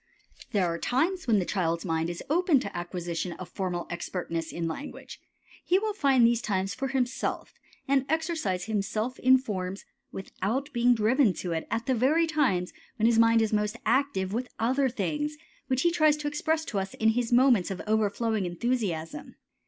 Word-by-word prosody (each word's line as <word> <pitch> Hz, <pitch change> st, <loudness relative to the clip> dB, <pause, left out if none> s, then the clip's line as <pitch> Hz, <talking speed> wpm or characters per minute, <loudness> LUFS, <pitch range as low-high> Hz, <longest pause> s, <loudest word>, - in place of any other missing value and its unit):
There 200 Hz, -5 st, +2 dB
are 170 Hz, -1 st, -2 dB
times 335 Hz, +7 st, 0 dB
when 225 Hz, -3 st, +4 dB
the 185 Hz, -, 0 dB
child's 170 Hz, -3 st, -1 dB
mind 165 Hz, -1 st, -1 dB
is 175 Hz, -, -6 dB
open 320 Hz, -1 st, +3 dB
to 200 Hz, -, -6 dB
acquisition 175 Hz, 0 st, -4 dB
of 185 Hz, -, -8 dB
formal 180 Hz, -3 st, -3 dB
expertness 170 Hz, -2 st, -4 dB
in 170 Hz, -1 st, -3 dB
language. 275 Hz, -, -7 dB, 0.4 s
He 365 Hz, -, +3 dB
will 425 Hz, +1 st, -1 dB
find 270 Hz, -, +4 dB
these 235 Hz, 0 st, +3 dB
times 195 Hz, -3 st, -1 dB
for 270 Hz, +5 st, -3 dB
himself 260 Hz, -2 st, -2 dB, 0.3 s
and 270 Hz, -1 st, +2 dB
exercise 315 Hz, -, -1 dB
himself 215 Hz, +4 st, -2 dB
in 260 Hz, +1 st, +6 dB
forms 195 Hz, -6 st, -5 dB, 0.3 s
without 230 Hz, +9 st, -3 dB
being 245 Hz, 0 st, +4 dB
driven 225 Hz, 0 st, +3 dB
to 180 Hz, -, -5 dB
it 160 Hz, -1 st, -3 dB
at 230 Hz, +1 st, -2 dB
the 260 Hz, -, +1 dB
very 280 Hz, +8 st, +3 dB
times 265 Hz, -, 0 dB, 0.2 s
when 225 Hz, -3 st, 0 dB
his 230 Hz, -1 st, +4 dB
mind 230 Hz, 0 st, +5 dB
is 220 Hz, -, -1 dB
most 210 Hz, +1 st, 0 dB
active 230 Hz, -9 st, +1 dB
with 245 Hz, +2 st, -2 dB
other 260 Hz, +4 st, +1 dB
things 295 Hz, -, -2 dB, 0.3 s
which 260 Hz, 0 st, 0 dB
he 345 Hz, -, +4 dB
tries 310 Hz, -3 st, +3 dB
to 300 Hz, -1 st, -4 dB
express 315 Hz, +2 st, -1 dB
to 205 Hz, -, -2 dB
us 195 Hz, 0 st, -5 dB
in 220 Hz, -, +2 dB
his 235 Hz, +1 st, 0 dB
moments 240 Hz, -6 st, +4 dB
of 195 Hz, -, -4 dB
overflowing 215 Hz, -1 st, 0 dB
enthusiasm. 175 Hz, -4 st, -3 dB
230 Hz, 180 wpm, -28 LUFS, 190-270 Hz, 0.4 s, in